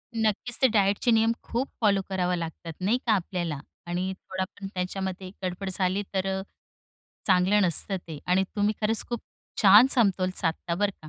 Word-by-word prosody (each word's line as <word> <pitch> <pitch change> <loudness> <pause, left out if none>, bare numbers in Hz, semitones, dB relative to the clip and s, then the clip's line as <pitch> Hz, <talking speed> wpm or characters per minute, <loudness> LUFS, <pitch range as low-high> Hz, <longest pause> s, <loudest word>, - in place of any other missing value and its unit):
नक्कीच 225 +2 0
ते 260 - +7
डाएटचे 205 +1 +2
नियम 225 0 +4
खूप 250 +4 -2
फॉलो 200 -2 +3
करावा 180 -2 0
लागतात, 165 -1 -6
नाही 210 +6 +2
का 225 - +5
आपल्याला 175 -6 -2 0.3
आणि 180 +2 -2 0.2
थोडा 190 0 -1 0.2
पण 195 - -5
त्याच्यामध्ये 185 0 -3
गडबड 185 +2 -3
झाली 190 +1 0
तर 190 0 0
अ, - - -4 0.9
चांगलं 190 +2 +4
नसतं 185 +2 +1
ते. 165 -5 -8
आणि 185 +2 +3
तुम्ही 205 +1 +2
खरंच 220 +1 +1
खूप 240 -2 -3 0.4
छान 210 +5 +9
समतोल 195 -7 +2
साधता 170 0 -1
बरं 205 +2 +1
का. 155 - -10
190 Hz, 170 wpm, -27 LUFS, 180-210 Hz, 0.9 s, छान